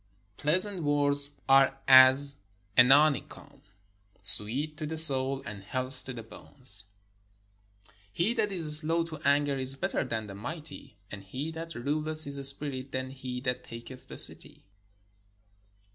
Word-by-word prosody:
Pleasant 185 - -2
words 145 -1 -1 0.2
are 135 0 +3
as 135 +1 +6 0.4
an 125 0 +5
honeycomb, 145 0 0 0.6
sweet 125 +10 +1
to 155 -2 -6
the 160 +1 -5
soul, 135 -3 +5
and 105 -2 -9
health 130 +5 -4
to 130 - -7
the 115 -2 -9
bones. 115 -2 -7 1.3
He 175 - -1
that 215 -4 -2
is 160 -5 +4
slow 165 +2 -1
to 165 -1 -9
anger 140 -1 0
is 130 0 -3
better 135 - -3
than 110 -1 -5
the 100 - -11
mighty; 135 +1 -10
and 100 -2 -10
he 130 +11 -7
that 165 0 -9
ruleth 155 +5 +2
his 140 -2 0
spirit 140 -1 +1
than 130 0 -5
he 130 -2 -8
that 125 -1 -4
taketh 120 +2 -11
a - - -10
city. - - +2
135 Hz, 145 wpm, -27 LUFS, 130-155 Hz, 1.3 s, as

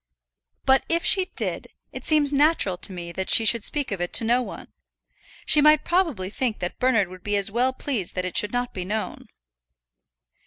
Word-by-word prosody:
"But 265 0 +4
if 335 +1 0
she 380 -2 +4
did, - - -3 0.2
it - - -8
seems 295 -2 +2
natural 285 - +2
to 180 - -2
me 175 -2 -7
that 190 +2 -5
she 225 - +6
should 230 0 +3
speak 290 -3 -2
of 195 -3 -4
it 175 - -3
to - - +5
no 240 +3 +2
one. 245 - -9 0.7
She 300 - +5
might 305 0 +4
probably 315 - -1
think 235 -1 -2
that 175 - -6
Bernard 230 -6 +2
would 185 0 -12
be 205 0 -1
as 200 0 0
well 245 +4 +1
pleased 255 -8 -4
that 185 -1 -2
it 185 - -5
should 210 - +1
not 245 0 -3
be 185 - -5
known." 210 +4 -5
230 Hz, 200 wpm, -23 LUFS, 190-285 Hz, 0.7 s, she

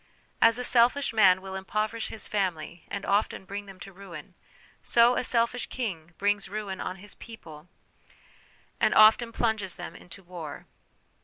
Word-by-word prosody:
As 230 0 +6
a 250 - -3
selfish 245 +2 +3
man 190 -4 +5
will 190 0 -7
impoverish 215 +4 -2
his 220 - -5
family 175 -4 -3
and 200 - -5
often 200 -1 0
bring 200 +1 -6
them 195 -1 -12
to 195 - -10
ruin; 190 -1 -11 0.5
so 235 +1 +4
a - - 0
selfish 235 0 0
king 175 -9 -5
brings 205 0 0
ruin 200 -2 -5
on 185 - -4
his 205 +2 -7
people 165 -9 -12 1.1
and - - +3
often 220 +2 +6
plunges 220 -6 -1
them 175 -1 -8
into 190 +2 -12
war. 170 -5 -8
200 Hz, 155 wpm, -27 LUFS, 185-225 Hz, 1.1 s, As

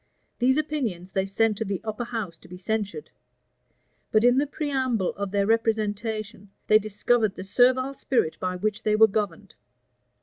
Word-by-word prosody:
These 260 +3 +3
opinions 245 - -2
they 190 0 -1
sent 210 +1 +1
to - - 0
the 195 -3 -3
upper 220 +2 -4
house 220 -8 -4
to - - -18
be 180 - -10
censured; 220 - -3 1.0
but 215 0 +4
in 245 +2 +5
the 290 - +1
preamble 260 - -1
of 200 -1 -4
their 200 0 +1
representation, 215 -2 -1 0.2
they 215 - +6
discovered 215 0 +1
the - - -7
servile 255 +6 +3
spirit 245 -11 0
by 185 0 -2
which 210 +3 -2
they 215 -1 +1
were 220 +1 +8
governed. 205 -5 -3
215 Hz, 165 wpm, -25 LUFS, 200-240 Hz, 1.0 s, were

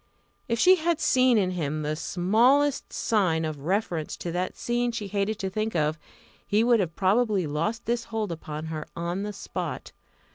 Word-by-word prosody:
If 230 - 0
she 370 +10 +6
had 335 -1 0
seen 255 -2 +4
in 185 -3 +2
him 155 -3 -2
the 150 +1 -1
smallest 235 - +2
sign 180 -8 +1
of 155 -2 -4
reference 170 0 -2
to 170 - -4
that 180 +2 -2
scene 240 0 0
she 230 -3 -4
hated 200 +2 -1
to 195 -3 -3
think 215 0 -2
of, 155 0 +1 0.5
he 210 +2 +3
would 235 -1 +4
have 170 -4 -1
probably 200 -1 +2
lost 165 +11 -2
this 235 -1 -1
hold 220 -4 -3
upon 155 -1 -6
her 155 -1 -5
on 170 +3 -2
the 210 +1 -3
spot. 200 - -5
200 Hz, 180 wpm, -26 LUFS, 165-230 Hz, 0.5 s, she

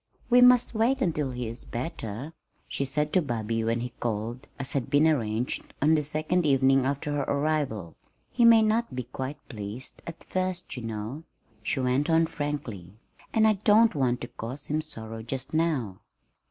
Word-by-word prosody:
"We 245 +1 +7
must 250 -1 +6
wait 235 +5 +2
until 155 - 0
he 125 -2 -4
is 115 +2 -7
better," 120 +1 -5 0.3
she 140 - -2
said 150 +3 -1
to 185 - +5
Bobby 115 -5 -2
when 115 +1 0
he 125 0 -5
called, 115 +2 -3
as 135 0 -4
had 135 -4 -1
been 145 +2 +4
arranged, 120 -5 -1
on 155 +3 +4
the 155 - +3
second 155 +4 0
evening 135 -2 +4
after 140 +2 -2
her 145 -1 0
arrival. 140 - -1 0.4
"He 240 - +2
may 230 -1 +8
not 220 - +1
be 125 - -2
quite 130 +4 -6
pleased 110 +1 -7
at 165 - -8
first, 185 -1 -2
you 125 - -5
know," 115 +5 -5 0.4
she 120 - -1
went 130 +4 +1
on 165 0 +4
frankly; 135 - -5 0.4
"and 220 0 +4
I 215 -3 +2
don't 220 +2 +6
want 125 -4 0
to 120 - -4
cause 130 +6 -7
him 155 +1 0
sorrow 115 -7 -7
just 130 +5 -5
now." 150 - 0
140 Hz, 180 wpm, -27 LUFS, 115-160 Hz, 0.4 s, may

